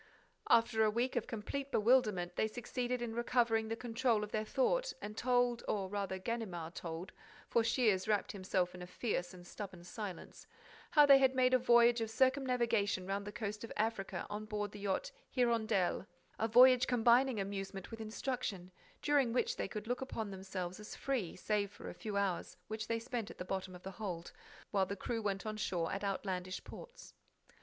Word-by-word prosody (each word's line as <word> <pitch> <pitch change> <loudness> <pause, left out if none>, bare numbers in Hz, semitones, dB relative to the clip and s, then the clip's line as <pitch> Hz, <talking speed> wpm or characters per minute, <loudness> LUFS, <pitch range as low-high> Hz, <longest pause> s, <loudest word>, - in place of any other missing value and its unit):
After 230 -1 +4
a 215 - +4
week 240 +4 0
of 240 - -1
complete 270 +5 -4
bewilderment, 210 -7 +3
they 220 - +2
succeeded 245 +2 -3
in 230 -1 -3
recovering 230 -1 +2
the 225 - -2
control 230 -2 +1
of 210 - -6
their 215 - 0
thought - - +1
and 210 +1 -6
told—or 240 -5 +1
rather 200 -1 -2
Ganimard 185 -6 -4
told, 170 +1 -6 0.4
for 235 - +3
Shears 225 -5 +2
wrapped 210 +3 +1
himself 185 -3 -1
in 180 - -9
a 180 - -7
fierce 180 -3 -2
and 180 -1 -12
stubborn 185 -2 -8
silence—how 210 - -1
they 275 -1 +8
had 265 -1 +4
made 255 0 +4
a 255 - +6
voyage 235 -1 +5
of 225 - -1
circumnavigation 245 -6 +2
round 200 +1 -3
the - - -4
coast 215 -1 -4
of 230 - -7
Africa 195 -5 -1
on 210 +1 -5
board 210 -1 -3
the 210 - -9
yacht 200 - -1 0.2
Hirondelle, 225 -7 +1 0.3
a 225 - +2
voyage 250 +2 +7
combining 245 0 +4
amusement 195 0 -4
with 225 0 -6
instruction, 215 -5 -3 0.3
during 280 -5 +3
which 470 - +1
they - - -2
could 210 -1 -6
look 245 +3 -2
upon 225 -5 -4
themselves 185 -1 -5
as 210 - -8
free, 250 -11 -2
save 205 +2 0
for 205 - -8
a - - -9
few 210 -2 -4
hours 195 -3 -1
which 220 0 -4
they 230 - 0
spent 235 -1 -4
at - - -10
the 180 - -5
bottom 190 0 -4
of 180 - -12
the 190 - -6
hold, 180 -4 -5 0.4
while 195 -2 +2
the 200 - -3
crew 225 +3 -3
went 200 -1 -2
on 215 0 -3
shore 175 -5 -1
at 195 +1 -3
outlandish 185 -2 -3
ports. - - -11
215 Hz, 185 wpm, -35 LUFS, 195-240 Hz, 0.4 s, they